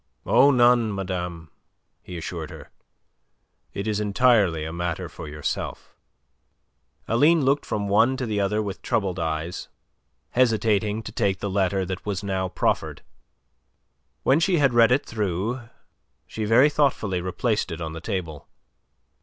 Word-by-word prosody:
"Oh, 140 - +5
none, 120 -4 +4
madame," 90 -4 -5 0.5
he 90 - -8
assured 85 - -5
her. - - -12 1.0
"It 100 0 -5
is 105 -1 0
entirely 100 -6 +2
a 80 - -5
matter 85 +1 -3
for 85 0 -9
yourself." 75 0 -5 1.1
Aline 145 +6 +4
looked 140 +2 +1
from 105 -1 -2
one 115 +6 +3
to 130 - -2
the 105 -3 -2
other 105 +2 0
with 100 -2 -6
troubled 95 -4 -1
eyes, 80 +1 -3 0.6
hesitating 110 -3 +1
to - - -7
take 100 -5 0
the 100 +1 -4
letter 95 0 +1
that 95 0 -5
was 100 -1 -3
now 95 -2 -2
proffered. - - -1 1.2
When 135 +4 +4
she 175 +1 +2
had 135 -4 +3
read 115 0 +5
it 130 +3 +2
through, 110 +4 -3 0.6
she 110 - -5
very 125 +7 +5
thoughtfully 110 -11 +1
replaced 105 +5 -1
it 80 - -5
on 80 -2 -5
the 80 - -7
table. 85 -7 -5
100 Hz, 145 wpm, -24 LUFS, 90-120 Hz, 1.2 s, Oh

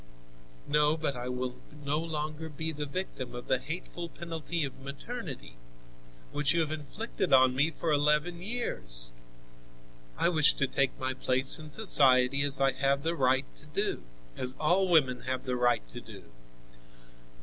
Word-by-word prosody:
"No, 150 +1 +3
but 150 -4 -2
I 125 0 -5
will 125 0 -3 0.3
no 145 +2 0
longer 155 -1 -4
be 160 +2 -4
the 150 -1 -4
victim 140 -6 -5
of 120 - -8
the 130 - +2
hateful 170 +3 -6
penalty 165 -1 -4
of 135 -1 -9
maternity, 140 - -7 0.7
which 145 +2 +1
you 170 - +3
have 155 -1 -1
inflicted 155 +4 -4
on 130 -1 +6
me 145 +4 +3
for 165 0 -3
eleven 150 +4 +2
years! - - 0 1.0
I - - +3
wish 155 -4 +5
to 140 - +1
take 135 0 0
my 130 0 -2
place 130 +2 +2
in 155 -1 -9
society 140 -8 +4
as 140 -1 +1
I 135 0 +4
have 135 +1 0
the 165 +1 +1
right 130 -2 +2
to 150 - -11
do, 150 - -2 0.3
as 130 +1 -4
all 180 +5 +3
women 140 -8 +3
have 130 0 -2
the 125 -1 -1
right 120 - +1
to - - -8
do." - - -12
145 Hz, 160 wpm, -30 LUFS, 130-160 Hz, 1.0 s, on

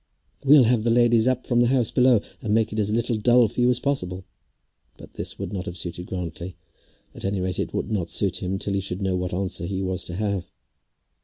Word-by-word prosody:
"We'll 140 0 +7
have 115 -1 +2
the 120 - +2
ladies 120 0 +4
up 130 -1 0
from 120 -1 +2
the 120 - +4
house 120 -2 +1
below, 125 -3 +4 0.2
and 110 -1 0
make 110 -1 +1
it 110 - -2
as 105 0 +1
little 115 +1 0
dull 120 +2 +4
for 125 - -3
you 120 - +4
as 125 -1 +2
possible." 95 -10 -2 0.7
But - - -14
this - - -5
would 100 0 -5
not 95 0 -4
have 85 - -6
suited 90 +1 -6
Grantly, 90 -1 -6 0.6
at - - -10
any 95 0 -1
rate 90 0 -2
would - - -3
not 90 -6 -1
suit 95 +2 0
him 95 +1 -2
till 100 +1 -3
he 100 - 0
should 95 0 -3
know 95 -1 0
what 90 0 -2
answer 90 -1 -3
he 95 0 -3
was 95 -1 -2
to 85 - -6
have. 100 -2 -2
100 Hz, 230 wpm, -24 LUFS, 90-120 Hz, 0.7 s, We'll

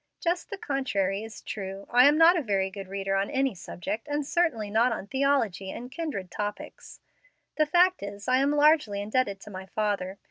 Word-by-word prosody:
Just 350 +1 -1
the 400 - -5
contrary 205 - -1
is 220 0 -9
true. 195 -1 -6
I 250 +2 +7
am 295 +1 +4
not 330 +2 +7
a 340 - +1
very 195 -6 0
great 195 -1 -8
reader 195 0 -2
on 195 +1 0
any 270 -2 0
subject, 195 - -6
and 290 0 -2
certainly 275 -11 0
not 230 +4 +3
on 220 - -4
theology 265 -7 0
and 245 +5 -7
kindred 255 - -5
topics. 210 0 -6 0.6
The 310 -1 +3
fact 360 +4 +4
is 200 0 -7
I 255 0 +4
am 275 +2 +2
largely 295 -8 +3
indebted 205 -1 -1
to 210 - -11
my 190 0 -8
father. 200 -2 -2
220 Hz, 190 wpm, -27 LUFS, 195-285 Hz, 0.6 s, I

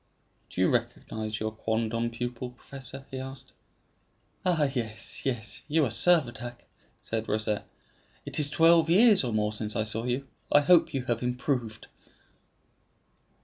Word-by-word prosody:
"Do - - -7
you - - +5
recognize 110 -1 -2
your 110 0 -2
quondam 115 +1 -1
pupil, 120 +1 -4
professor?" 135 +1 -9
he 130 - -4
asked. 135 0 -8 0.9
"Ah, 175 -4 +2
yes, 120 -6 -3
yes; 115 -5 -2
you 155 0 +3
are 120 - -2
Servadac," 120 -5 +1 0.4
replied 115 0 -3
Rosette. 105 0 -1 0.6
"It - - -2
is 145 -1 +3
twelve 165 +2 +5
years 205 +1 +6
or 120 - -1
more 105 0 0
since 105 0 -4
I 110 - +1
saw 110 +2 -1
you; 125 +2 -2 0.2
I 145 - +7
hope 165 0 +4
you 130 - -1
have 120 -2 -1
improved." 125 -2 -2
125 Hz, 145 wpm, -28 LUFS, 110-140 Hz, 0.9 s, I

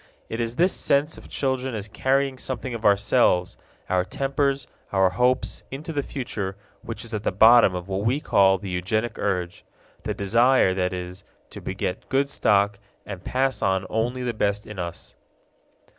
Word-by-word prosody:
It 115 - -3
is 115 0 -3
this 180 +6 +3
sense 145 +3 +1
of - - -13
children 130 -2 -1
as 105 -1 -5
carrying 135 +4 0
something 130 -1 -4
of 115 - -6
ourselves, 100 -3 +3 0.3
our 90 -1 +2
tempers, 140 +5 -1 0.3
our 95 -2 +3
hopes, 125 +7 +1
into 150 +5 -6
the 145 - 0
future 105 -9 -4 0.3
which 115 +1 -6
is 115 - -9
at 105 - -2
the - - 0
bottom 110 0 +6
of 90 0 -5
what 95 0 -2
we 125 +6 +1
call 95 -8 +4
the 95 0 -7
eugenic 110 +6 -1
urge 90 -4 -2 0.4
the - - -3
desire, 115 +1 +3
that 90 -1 0
is, 90 +1 -6 0.3
to - - -9
beget 90 - -4
good 140 +1 +1
stock 100 -1 +2 0.3
and 95 -2 -7
pass 130 -3 0
on 95 -1 +1
only 120 +3 -1
the 120 -1 -1
best 105 -1 -1
in 105 -3 -9
us. 85 -1 -6
110 Hz, 175 wpm, -24 LUFS, 95-130 Hz, 0.4 s, bottom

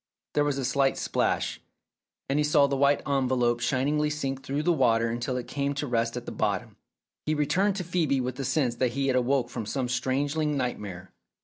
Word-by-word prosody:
There 145 - +3
was 145 -2 0
a 135 - -2
slight 135 +1 +2
splash, - - -1 0.7
and 140 +2 +1
he - - +3
saw 150 -1 +4
the 140 0 0
white 140 +1 +2
envelope 130 -3 +1
shiningly 145 +5 +1
sink 135 -3 -3
through 140 +3 -2
the 175 - +3
water 115 -6 +2
until 120 +2 -2
it 125 - -5
came 140 0 -2
to 145 - -2
rest 115 -2 0
at 120 - -6
the - - -5
bottom. - - -2 0.5
He 155 - +2
returned 185 +7 +1
to 190 - -3
Phcebe 160 -6 +1
with 125 0 -3
the 135 - -3
sense 130 -2 +1
that 125 -2 +1
he 135 +1 0
had 130 - +2
awoke 125 -1 +1
from 115 -3 -5
some 130 +1 -1
strangling 145 +4 0
nightmare. 100 -8 -4
135 Hz, 205 wpm, -27 LUFS, 125-145 Hz, 0.7 s, saw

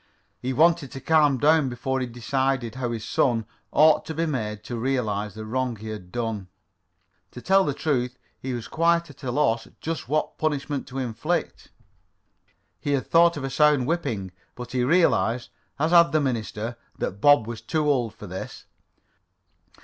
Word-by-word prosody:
He 130 - -3
wanted 160 +1 +3
to 135 - -6
calm 150 -2 +3
down 150 +1 +4
before 130 +2 -2
he 130 - -2
decided 125 0 -1
how 125 -1 -3
his 115 -2 -4
son 115 -4 +1 0.3
ought 155 0 +5
to 160 - -5
be 165 +2 0
made 110 -8 -3
to 120 - -5
realize 110 -5 -1
the 110 0 -7
wrong 125 +1 -1
he 110 +1 -8
had 90 -5 -8
done. 115 -5 -3 0.8
To 125 - -10
tell 195 +8 +4
the 145 -6 -1
truth, 125 -5 -1 0.2
he 130 - -4
was 120 -2 -5
quite 170 -1 +1
at 140 - -19
a 130 - -4
loss 120 -4 +1
just 160 -5 -4
what 155 +1 -1
punishment 145 -2 -2
to 135 - -8
inflict. 135 +7 -2 1.1
He 145 - -1
had 135 - 0
thought 170 -1 +4
of 140 - -5
a 135 - -3
sound 150 -2 +4
whipping, 120 - -2 0.2
but 125 -1 -8
he 125 -1 0
realized, 125 -5 +2 0.3
as 155 +3 0
had 170 -1 +6
the 155 - +4
minister, 115 -3 -3 0.2
that 100 +2 -4
Bob 145 -6 +6
was 115 -1 -6
too 150 +6 -1
old 125 -6 +1
for - - -10
this. 95 -1 -7
130 Hz, 175 wpm, -25 LUFS, 115-150 Hz, 1.1 s, had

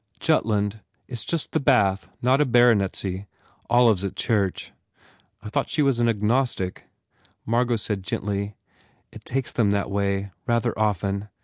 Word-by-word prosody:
"Jutland. 105 -1 +1 0.3
It - - -25
s 120 - -1
just 165 -3 -2
the - - +1
Bath, 100 -10 +2 0.2
not 130 +3 +4
a - - +4
baronetcy. 100 -5 +2 0.4
Olive 120 -4 +5
s - - -4
at 100 - -3
church." 100 -5 -1 0.7
"I 105 - -6
thought - - -1
she 150 - +1
was 135 -4 +2
agnostic?" 115 -3 0 0.6
Margot 120 +1 +1
said 105 -2 -3
gently, 100 +1 -3 0.6
"It - - -13
takes 135 -1 -2
them 110 -4 +2
that 100 0 0
way, 100 0 -1 0.2
rather 115 0 +1
often. 100 -1 -1
105 Hz, 145 wpm, -24 LUFS, 100-120 Hz, 0.7 s, Olive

